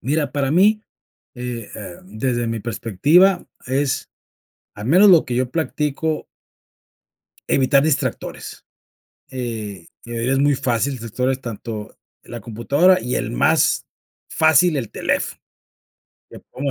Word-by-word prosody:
Mira, 145 +1 -1
para 140 -2 0
mí, 210 +6 +4 0.5
eh 125 -3 -6
eh, 95 -5 -8
desde 120 +4 -2
mi 115 -1 -3
perspectiva, 145 - +2 0.2
es, 135 +1 -1 0.6
al 105 +2 -7
menos 185 +8 +6
lo 170 -3 +6
que 125 - -4
yo 125 -1 0
practico 155 0 -2 1.3
evitar 135 +1 +4
distractores. 155 -3 -3 0.7
Eh, 110 -8 -5 0.2
de 120 - -10
verdad 120 +3 -1
es 135 - +1
muy 145 0 +3
fácil, 130 0 0
distractores 125 +2 -2
tanto 110 -2 -7 0.2
la 120 - -9
computadora, 140 - +2
y 125 - -2
el - - -2
más - - +2 0.4
fácil, 160 0 +4
el 115 -5 -4
teléfono. - - -2 0.9
Te - - -11
pongo 140 +1 -5
130 Hz, 125 wpm, -20 LUFS, 115-150 Hz, 1.3 s, menos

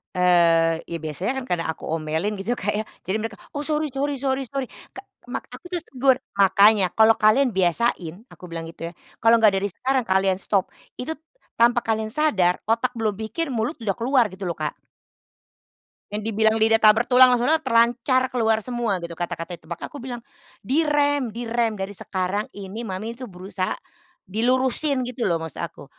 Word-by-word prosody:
Eee, 165 -2 +4
ya 170 - -3
biasanya 160 - -3
kan 260 - -4
karena 165 -1 -2
aku 160 - -5
omelin 160 +5 -2
gitu 210 +5 -3
Kak 205 +2 -1
ya, 210 - 0 0.2
jadi 210 +4 -1
mereka 225 -2 -5 0.2
"oh 290 - -3
sorry 300 -2 -1
sorry 280 +1 -1
sorry 265 0 0
sorry" 275 -2 -2 0.2
ka - - -12 0.2
mak - - -4
aku 355 - -11
tuh 350 -2 -2
tegur. 260 0 +2 0.2
"Makanya 200 0 +5
kalau 220 0 +7
kalian 225 +3 +3
biasain" 180 -2 0 0.2
aku - - -19
bilang 165 -1 -5
gitu 165 0 -7
ya, - - -13 0.3
"kalau 230 +1 +6
nggak 215 -3 +5
dari 200 - -1
sekarang 260 +7 0
kalian 190 0 +2
stop, 195 -3 +1 0.3
itu 315 +6 -3 0.5
tanpa 240 +1 +4
kalian 220 -1 -1
sadar 215 - +2
otak 230 +3 +1
belum 215 -2 0
mikir 260 +6 -3
mulut 230 +7 -2
udah 215 -5 -1
keluar" 245 +2 +2
gitu 190 -2 -5
loh, 170 - -4
Kak. 150 -1 -4 1.3
Yang 210 +1 -3
dibilang 220 +1 +3
lidah 225 0 +4
tak 215 0 +7
bertulang, 250 +2 +6
maksudnya 250 +6 +2
terlancar 245 +2 +2
keluar 220 -3 +1
semua 240 -6 -1
gitu 170 -1 -7
kata-katanya. 170 0 -5
Tepak 160 - -20
makanya - - -7
aku 285 - -7
bilang, 245 -2 -6 0.4
"di 285 +8 +2
rem, 290 -4 +1
di 235 +3 -6
rem 230 -2 0
dari 195 +1 -4
sekarang 190 +2 -3
ini, 200 +3 -7
Mami 220 +2 -5
tuh 250 -1 -9
berusaha 185 +1 -4 0.5
dilurusin" 255 - +1
gitu 240 -5 -2
loh 170 - +2
maksud 160 -3 -7
aku. - - -7
220 Hz, 180 wpm, -23 LUFS, 190-250 Hz, 1.3 s, kalau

